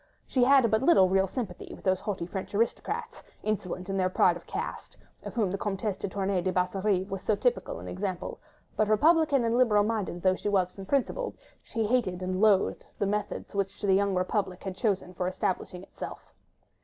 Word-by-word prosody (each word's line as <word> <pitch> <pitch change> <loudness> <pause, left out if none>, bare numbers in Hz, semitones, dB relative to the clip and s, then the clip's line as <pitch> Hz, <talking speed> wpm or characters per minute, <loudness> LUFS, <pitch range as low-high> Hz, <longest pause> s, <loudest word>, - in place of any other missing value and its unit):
She 255 - +2
had 265 -4 +5
but 220 +1 +3
little 270 - +6
real 190 +1 +3
sympathy 195 -4 -5
with - - -16
those 185 -1 +2
haughty 195 -5 -3
French 190 +2 -6
aristocrats, 430 - -1 0.2
insolent 185 -4 -2
in 195 0 -2
their 185 -1 +2
pride 180 -1 +4
of 175 - -11
caste, - - -5 0.2
of - - -8
whom 210 -6 +1
the 195 - -3
Comtesse 205 0 -2
de - - -3
Tournay 195 -1 0
de 185 +1 0
Basserive 185 +1 0
was 195 -1 -3
so 215 - +1
typical - - 0
an - - -9
example; 185 -1 -4 0.4
but, 215 - +2
republican 290 +3 +4
and 230 0 +1
liberal 225 -5 +4
minded 205 -5 -2
though 185 -1 +5
she 195 - -3
was 185 -3 +2
from 195 0 -10
principle, 280 - 0 0.3
she 225 -2 -2
hated 205 -6 0
and 185 +1 -1
loathed 205 -3 +3
the - - 0
methods 205 +1 -3
which 200 -1 -2
the 200 -2 +2
young 200 0 +2
Republic 185 0 -1
had 190 -2 -4
chosen 190 -3 -1
for 180 0 -2
establishing 185 0 -2
itself. - - -9
195 Hz, 195 wpm, -28 LUFS, 185-220 Hz, 0.4 s, little